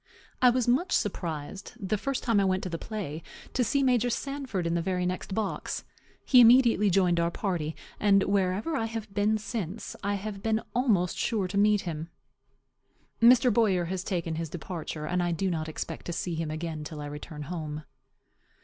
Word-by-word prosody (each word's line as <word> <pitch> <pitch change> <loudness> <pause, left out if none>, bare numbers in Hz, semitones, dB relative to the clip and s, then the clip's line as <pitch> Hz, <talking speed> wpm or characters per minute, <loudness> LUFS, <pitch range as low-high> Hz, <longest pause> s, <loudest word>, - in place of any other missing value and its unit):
I 250 - +8
was 245 -1 +1
much 265 +10 +2
surprised, 170 0 -3
the 200 0 -1
first 275 +6 -2
time 230 -4 +3
I - - +3
went 190 0 +1
to 185 - -3
the 165 -1 -4
play, 190 -8 -5 0.3
to 255 - +2
see 275 +5 +1
Major 245 -2 +3
Sanford 265 -7 -3
in 170 - 0
the 170 - +1
very 180 +1 -1
next 185 +1 -3
box. 215 -3 -2 0.4
He 255 - +6
immediately 235 -3 +6
joined 180 -2 +3
our 170 0 +2
party; 170 -4 -2 0.2
and 195 -2 +4
wherever 200 - 0
I 225 - 0
have 225 -3 -6
been 210 +2 +2
since, 210 -2 -5
I 200 +1 0
have 200 0 -5
been 220 0 0
almost 210 -8 +1
sure 210 -5 0
to 190 - -6
meet 205 0 +4
him. 165 -1 -5 1.1
Mr. 240 0 +6
Boyer 195 -6 +3
has 185 +1 -3
taken 170 -4 -2
his 165 -1 -3
departure; 160 -2 -5
and 180 +3 0
I 175 0 0
do 185 +3 0
not 160 -2 -2
expect 155 - -6
to 175 - -2
see 175 +1 -3
him 160 -1 -2
again 155 0 -4
till 150 0 -7
I 145 - -5
return 150 +1 -7
home. 155 -1 -5
190 Hz, 190 wpm, -28 LUFS, 170-220 Hz, 1.1 s, I